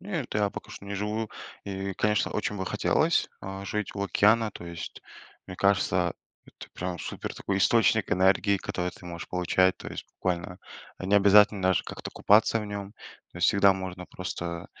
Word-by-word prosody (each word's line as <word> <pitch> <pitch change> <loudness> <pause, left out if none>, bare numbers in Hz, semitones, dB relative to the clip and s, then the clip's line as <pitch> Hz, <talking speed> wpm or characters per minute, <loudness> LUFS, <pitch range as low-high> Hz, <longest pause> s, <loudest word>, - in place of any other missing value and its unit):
Нет. 170 -11 -4
Я 105 -1 +2
пока - - -9
что - - -10
не 100 0 -5
живу. 105 +2 -2 0.3
И 95 0 -4
конечно, 105 +2 +1
очень 105 -1 -2
бы 95 - -4
хотелось, - - +2
а, 95 0 -6
жить 105 +1 -3
у 100 - -3
океана, 110 +3 +3
то 90 - -10
есть 85 -1 -7 0.5
мне 90 - -8
кажется, 100 -1 +2 0.3
это - - -13
прям 90 -1 -4
супер - - -6
такой 95 - -2
источник 110 0 +3
энергии, 95 +2 +3
который 90 -2 -3
ты 90 - -14
можешь 85 -1 -7
получать 90 +1 +2
то - - -8
есть - - -7
буквально. 90 0 -2 0.4
Не 95 +2 0
обязательно 100 0 +6
даже 95 -2 +2
как-то - - -7
купаться 110 +2 +4
в - - -5
нем. 100 -1 -6 0.4
То - - -10
есть 85 - +4
всегда 100 -1 +5
можно 95 -1 -6
просто 85 -2 -5
100 Hz, 180 wpm, -27 LUFS, 90-105 Hz, 0.5 s, обязательно